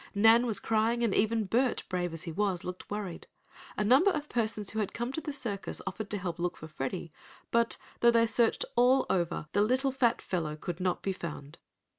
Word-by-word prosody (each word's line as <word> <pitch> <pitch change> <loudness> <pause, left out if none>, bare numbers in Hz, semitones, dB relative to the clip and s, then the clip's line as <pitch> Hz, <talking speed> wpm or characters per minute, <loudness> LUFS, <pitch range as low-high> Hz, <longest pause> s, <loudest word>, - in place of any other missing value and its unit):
Nan 225 +4 +6
was 220 - 0
crying, 225 +2 +1
and 225 -4 +2
even 220 +1 +2
Bert, 240 +5 +1
brave 180 -2 -2
as 165 0 -4
he 170 - -5
was, 190 0 -1
looked 180 0 -7
worried. 205 -4 -5 0.5
A - - +1
number 265 - +5
of 300 -5 -2
persons 215 -3 -1
who 220 - -3
had 210 - -2
come 240 +2 -2
to 320 - -3
the 300 - -4
circus 235 -8 -4
offered 200 +2 -5
to 210 - -1
help 180 -3 -4
look 175 +1 -2
for 160 - -9
Freddie, 155 +2 -5 0.4
but, 235 0 +2 0.2
though 235 - +6
they 230 -1 +5
searched 230 +1 +1
all 250 +2 +5
over, 170 -4 0
the 205 - +2
little 260 +5 +2
fat 250 -3 +2
fellow 160 -5 -3
could 170 +3 -5
not 180 -1 -1
be 195 - 0
found. 150 -5 -7
210 Hz, 210 wpm, -30 LUFS, 180-235 Hz, 0.5 s, Nan